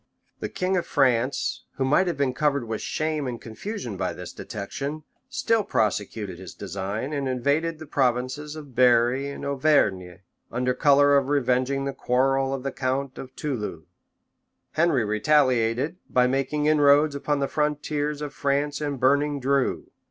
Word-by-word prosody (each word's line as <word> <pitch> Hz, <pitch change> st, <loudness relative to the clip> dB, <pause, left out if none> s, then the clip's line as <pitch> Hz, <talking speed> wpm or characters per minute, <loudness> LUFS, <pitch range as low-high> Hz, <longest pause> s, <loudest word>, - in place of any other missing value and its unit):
The -, -, -4 dB
king 185 Hz, +1 st, -1 dB
of 175 Hz, -, -2 dB
France, 130 Hz, -2 st, +1 dB
who 135 Hz, -, 0 dB
might 150 Hz, +8 st, +3 dB
have 170 Hz, -4 st, -1 dB
been 140 Hz, -2 st, +1 dB
covered 140 Hz, -3 st, 0 dB
with 110 Hz, -1 st, -3 dB
shame 155 Hz, -3 st, -2 dB
and 120 Hz, -2 st, -4 dB
confusion 120 Hz, -, -6 dB
by -, -, -2 dB
this -, -, -8 dB
detection, 140 Hz, +9 st, -5 dB, 0.3 s
still 230 Hz, -4 st, +1 dB
prosecuted 105 Hz, -, -1 dB
his 95 Hz, -2 st, -10 dB
design, 100 Hz, -, -4 dB
and 140 Hz, -2 st, -1 dB
invaded 145 Hz, +6 st, 0 dB
the 155 Hz, -, -9 dB
provinces 130 Hz, +2 st, -1 dB
of 145 Hz, -4 st, -10 dB
Berri 125 Hz, +2 st, +3 dB
and 140 Hz, -, -7 dB
Auvergne, 100 Hz, -, +1 dB, 0.3 s
under 125 Hz, +2 st, 0 dB
color 145 Hz, 0 st, +5 dB
of 135 Hz, -1 st, +1 dB
revenging 135 Hz, 0 st, +1 dB
the 140 Hz, -, -2 dB
quarrel 135 Hz, +1 st, +1 dB
of 135 Hz, -2 st, -3 dB
the 135 Hz, -, -2 dB
count 130 Hz, +1 st, -2 dB
of 130 Hz, 0 st, -9 dB
Toulouse. 105 Hz, -, -4 dB, 0.9 s
Henry 155 Hz, -8 st, +2 dB
retaliated 130 Hz, -, +2 dB
by 125 Hz, 0 st, +3 dB
making 135 Hz, +3 st, 0 dB
inroads 150 Hz, 0 st, +5 dB
upon 145 Hz, +1 st, -1 dB
the 140 Hz, -, 0 dB
frontiers 150 Hz, 0 st, -1 dB
of 145 Hz, -1 st, -5 dB
France 145 Hz, +1 st, -1 dB
and 145 Hz, -3 st, -2 dB
burning 140 Hz, +3 st, +2 dB
Dreux. 135 Hz, 0 st, 0 dB
140 Hz, 155 wpm, -25 LUFS, 125-150 Hz, 0.9 s, color